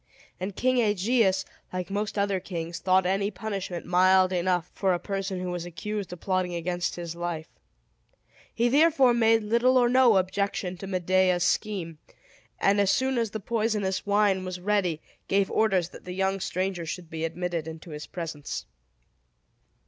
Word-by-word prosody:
And 185 +1 -4
King 255 0 +2
Aegeus, 205 -2 +2 0.3
like 185 +1 -4
most 205 +1 -2
other 200 -1 +1
kings, 170 -2 -5
thought 185 0 +3
any 195 +2 +1
punishment 195 -4 -5
mild 185 +1 +4
enough 180 -1 0
for 190 -2 +1
a - - -3
person 195 0 -3
who 180 0 -3
was 175 -1 -3
accused 200 +3 -5
of 180 - -8
plotting 185 -1 -1
against 175 +1 -2
his 170 -1 -6
life. 170 -2 -4 1.1
He 235 - +1
therefore 280 -1 +5
made 225 -1 +3
little 235 +4 +3
or 245 -1 +5
no 245 -4 +5
objection 190 0 -1
to 195 - -7
Medea's 185 -1 +2
scheme, 175 -4 -1 0.6
and 200 +1 +3
as 200 - +2
soon 260 +4 +2
as 230 -2 0
the 220 - -5
poisonous 215 -3 -1
wine 200 -2 +2
was 185 -1 -5
ready, 180 -4 0 0.2
gave 195 0 +1
orders 190 -6 +2
that - - -13
the 180 - -6
young 190 +1 0
stranger 185 -2 -2
should 170 0 -6
be 160 0 -4
admitted 170 -1 -3
into 160 +1 -9
his 150 0 -7
presence. 160 -4 -5
190 Hz, 165 wpm, -27 LUFS, 180-210 Hz, 1.1 s, therefore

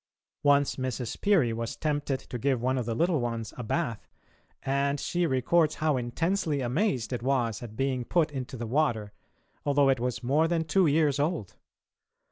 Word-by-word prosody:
Once 145 -1 +3
Mrs. 130 -3 -4
Peary 170 - +3
was 115 0 -4
tempted 145 -3 -1
to 125 - -7
give 135 0 +1
one 130 +2 0
of 120 - -4
the 115 - -1
little 170 +2 +2
ones 115 -2 -3
a - - -6
bath, 115 -1 -2 0.6
and 140 +1 0
she 175 +3 0
records 155 +4 +2
how 155 -2 +1
intensely 155 +6 -1
amazed 130 - 0
it 120 - -3
was 120 -4 0
at 115 -3 -8
being 130 -1 -1
put 160 +3 +1
into 130 -2 -5
the 120 - -4
water, 115 -5 0 0.5
although 140 -1 +3
it 130 -2 +2
was 125 0 -2
more 145 +6 +3
than 165 -1 0
two 165 +3 +3
years 145 -2 +2
old. 145 - -1
135 Hz, 175 wpm, -28 LUFS, 120-155 Hz, 0.6 s, Once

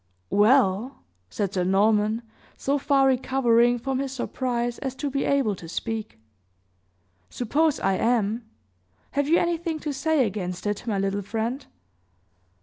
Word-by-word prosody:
"Well," 220 +2 +3 0.3
said 200 - -2
Sir 180 - 0
Norman, 210 +4 +2 0.3
so 280 +1 0
far 275 -1 +3
recovering 245 -2 +3
from 260 +2 -2
his 275 -1 -2
surprise 245 -2 -2
as 265 -1 -4
to 285 +1 -3
be 275 +1 -1
able 270 -8 +1
to 165 -2 -11
speak, 220 +3 -4 1.1
"suppose 295 +6 +1
I 195 - +1
am? 230 -1 +1 0.7
Have 285 +1 0
you 335 - +5
anything 340 -1 -1
to 295 - -3
say 285 0 +2
against 180 -3 -4
it, 205 +3 -3
my 210 -3 0
little 195 +1 -1
friend?" 230 +7 -3
240 Hz, 140 wpm, -25 LUFS, 210-275 Hz, 1.1 s, you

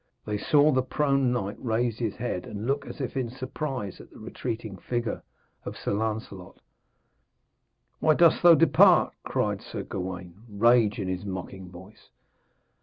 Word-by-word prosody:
They 105 -1 -2
saw 145 +7 +4
the 130 -2 +2
prone 135 -1 +1
knight 105 -4 -2
raise 115 -1 0
his 115 -4 -2
head 115 -7 -4
and 105 +2 -6
look 140 +3 -1
as - - -9
if 130 - -4
in 130 -3 -1
surprise 130 -4 -5
at - - -15
the - - -16
retreating 110 -4 -6
figure 120 +4 -3 0.4
of - - -7
Sir - - -3
Lancelot. 105 -3 -4 1.4
'Why 155 -1 +4
dost 170 0 +5
thou 175 -1 +8
depart?' 165 -2 +5
cried - - -1
Sir - - -6
Gawaine, 95 0 -6
rage 115 +1 +3
in 100 -4 -3
his 95 0 -3
mocking 95 -1 -7
voice. 95 +4 -15
115 Hz, 155 wpm, -27 LUFS, 100-130 Hz, 1.4 s, thou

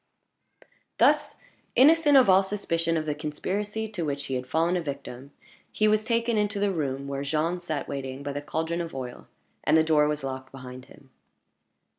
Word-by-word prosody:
Thus - - +3 0.4
innocent 295 +1 +6
of 260 - +6
all 190 0 +6
suspicion 165 -4 -1
of 155 - -2
the 150 - -1
conspiracy 200 +9 -3
to 200 -5 -4
which 140 -2 -3
he 135 - -4
had 125 0 -3
fallen 165 +5 +1
a 180 - 0
victim, 140 -3 -7 0.4
he 215 - +2
was 215 0 +3
taken 230 0 0
into 205 0 0
the 200 0 +1
room 140 -5 -3
where 140 0 -3
Jean 155 +5 -1
sat 160 -4 -4
waiting 135 0 -5
by 140 0 -4
the 145 - -4
caldron 160 +3 -2
of 165 -4 -6
oil, 125 -2 -7 0.4
and - - +4
the 160 - +5
door 155 -2 +3
was 150 -1 -2
locked 130 -1 -5
behind 130 -1 -10
him. 135 0 -19
160 Hz, 185 wpm, -26 LUFS, 140-195 Hz, 0.4 s, innocent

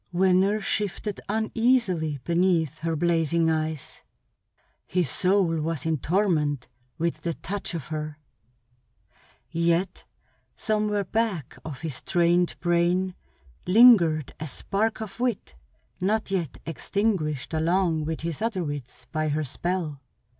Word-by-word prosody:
Venner 190 +3 +3
shifted 205 0 -2
uneasily 220 - +1
beneath 170 -2 +1
her 165 +1 -1
blazing 165 0 +2
eyes. 155 -2 -3 0.9
His 180 -3 +1
soul 180 -4 +2
was 160 -2 -2
in 160 -2 0
torment 155 -6 +1 0.3
with 170 0 -1
the 170 -2 -2
touch 195 0 -4
of 155 -5 -6
her; 155 -1 -4 1.3
yet 170 +2 0 0.5
somewhere 210 -2 0
back 195 - -1
of 145 -5 -7
his 155 -5 -5
trained 175 0 +2
brain 175 +2 +2 0.5
lingered 180 - +6
a 155 - -4
spark 215 - -1
of 215 0 -7
wit 245 -3 -1 0.5
not 205 +2 0
yet 175 -8 -1
extinguished 165 - -1
along 165 0 +1
with 160 0 -3
his 165 +1 -4
other 215 -5 0
wits 140 -4 -6
by 155 +1 0
her 155 +1 0
spell. 155 0 -3
170 Hz, 120 wpm, -26 LUFS, 155-195 Hz, 1.3 s, lingered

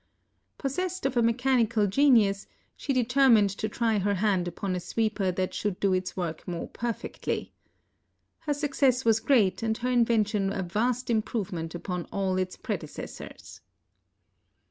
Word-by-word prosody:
Possessed 365 +6 -3
of 270 -1 0
a 240 - +4
mechanical 230 -2 +2
genius, 205 -3 +3 0.3
she 285 - -3
determined 250 -4 +4
to 215 +2 -3
try 225 -1 +1
her 200 +1 +1
hand 190 -2 +1
upon 185 +1 -3
a - - -2
sweeper 210 -1 -1
that 185 +1 -2
should 205 -3 -2
do 195 -2 +2
its 185 0 -2
work 170 -3 -4
more 175 -2 -4
perfectly. 235 -1 -4 0.9
Her 305 -2 -1
success 275 -3 +1
was 225 -1 +4
great, 220 -7 +2
and 220 -1 0
her 250 +1 -2
invention 215 -4 +2
a 195 -1 -2
vast 235 +7 -1
improvement 195 -7 -2
upon 180 0 -4
all 190 -1 0
its 185 0 -3
predecessors. - - -7
215 Hz, 145 wpm, -27 LUFS, 190-245 Hz, 0.9 s, a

